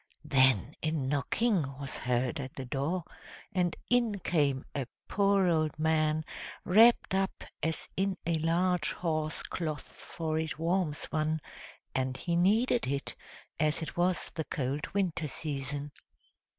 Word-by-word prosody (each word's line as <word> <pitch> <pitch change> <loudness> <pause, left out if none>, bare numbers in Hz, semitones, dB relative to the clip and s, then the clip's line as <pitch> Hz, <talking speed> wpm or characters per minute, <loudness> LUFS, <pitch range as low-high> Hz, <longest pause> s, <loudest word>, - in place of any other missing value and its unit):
Then 130 -3 +4
a 155 - +1
knocking 155 - +1 0.2
was 140 -1 -5
heard 125 +4 0
at 135 -1 -6
the 135 - -5
door, 145 +8 -1 0.5
and 180 -3 +1
in 240 -4 +2
came 145 -7 +1
a 140 -4 -2 0.2
poor 200 -2 +3
old 155 -3 +1
man 155 0 +2 0.4
wrapped 225 +3 +6
up 190 0 0 0.2
as 160 0 -1
in 195 0 0
a 165 -1 +1
large 170 +1 +1
horse 155 -2 -2
cloth, 155 -4 -3
for 160 -2 -3
it 160 -2 -3
warms 165 -1 0
one, 155 0 +1 0.5
and 130 0 -1
he 170 -1 -1
needed 215 - +3
it, 140 +1 -2 0.5
as 155 +1 +1
it - - -6
was 175 +1 +1
the 160 - -3
cold 140 +1 -2
winter 175 -5 0
season! 145 0 -3
160 Hz, 135 wpm, -31 LUFS, 145-180 Hz, 0.5 s, wrapped